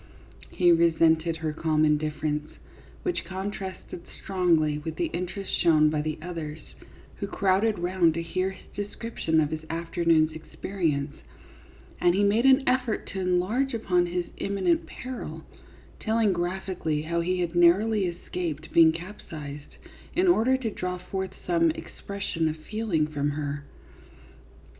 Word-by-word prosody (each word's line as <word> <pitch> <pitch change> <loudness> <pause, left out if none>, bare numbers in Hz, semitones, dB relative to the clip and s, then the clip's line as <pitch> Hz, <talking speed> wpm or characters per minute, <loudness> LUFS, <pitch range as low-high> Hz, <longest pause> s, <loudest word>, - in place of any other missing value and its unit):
He 175 -1 +4
resented 165 -1 +4
her 160 -1 -2
calm 155 0 +2
indifference, 150 0 0 0.5
which 360 - -1
contrasted 190 0 -6 0.2
strongly 165 -6 +2
with 160 +1 -5
the 335 -2 -1
interest 185 +2 -4
shown 155 -3 +5
by 150 -1 0
the 155 +1 -3
others, 165 -4 -5 0.6
who 200 - -3
crowded 200 +2 +2
round 175 -2 +2
to 165 - -2
hear 185 +3 -1
his 190 - -12
description 205 -5 -1
of 150 -1 +1
his 155 0 -4
afternoon's 165 -1 +2
experience, 155 -2 -2 0.9
and 175 0 +4
he 205 - +3
made 215 +6 +4
an 265 0 +5
effort 250 -3 +1
to 195 - -4
enlarge 190 +9 +1
upon 180 -5 +2
his 175 0 -2
imminent 190 -4 0
peril, 255 0 -7 0.6
telling 220 -2 +2
graphically 175 -3 -2
how 170 +1 -1
he 180 +2 0
had 175 -1 -1
narrowly 190 +4 +4
escaped 170 -3 -5
being 165 -1 +7
capsized, 155 -5 -8 0.4
in 365 +2 +3
order 260 -6 +4
to 235 -4 -3
draw 180 -2 -3
forth 190 +1 -5
some 170 -2 +3
expression 165 0 -3
of 155 - -4
feeling 195 -2 -1
from 145 -1 -1
her. 145 -1 -4
175 Hz, 140 wpm, -27 LUFS, 160-195 Hz, 0.9 s, being